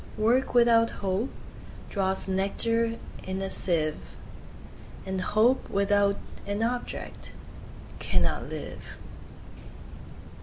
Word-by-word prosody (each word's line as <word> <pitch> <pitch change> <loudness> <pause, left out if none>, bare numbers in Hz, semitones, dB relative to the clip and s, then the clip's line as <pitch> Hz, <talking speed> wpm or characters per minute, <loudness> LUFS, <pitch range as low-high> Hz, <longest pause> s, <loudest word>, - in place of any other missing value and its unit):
Work 240 +5 +2
without 230 -1 +6 0.2
Hope 195 +7 0 0.6
draws 190 -1 +2
nectar 230 +4 +1 0.3
in 190 0 -3
a 195 0 -3
sieve, 155 -4 -1 0.9
And 190 -1 -2
Hope 225 +7 +2
without 200 0 +2 0.3
an 205 +2 -1
object 240 +1 -4 0.7
cannot - - 0
live. - - -6
205 Hz, 85 wpm, -27 LUFS, 190-230 Hz, 0.9 s, without